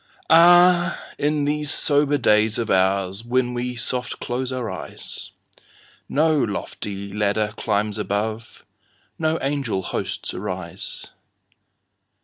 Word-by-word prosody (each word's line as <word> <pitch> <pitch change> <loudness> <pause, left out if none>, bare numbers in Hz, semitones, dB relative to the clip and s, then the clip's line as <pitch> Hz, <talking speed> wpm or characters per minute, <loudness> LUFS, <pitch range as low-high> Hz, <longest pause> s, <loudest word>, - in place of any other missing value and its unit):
Ah, 175 +1 +6 0.2
in 150 0 +1
these 150 0 0
sober 145 0 +2
days 105 -3 +3
of 115 - -2
oursWhen 100 +7 +1
we 125 0 -3
soft 125 +2 -2
close 125 +1 -3
our 125 -3 -3
eyes, - - -7 0.8
No 155 +2 +3
lofty 100 -3 -4
ladder 105 +1 0
climbs 105 0 -1
above, 110 +2 -3 0.5
No 160 0 +1
angel 135 -9 -1
hosts - - -4
arise. - - -5
120 Hz, 105 wpm, -22 LUFS, 105-145 Hz, 0.8 s, Ah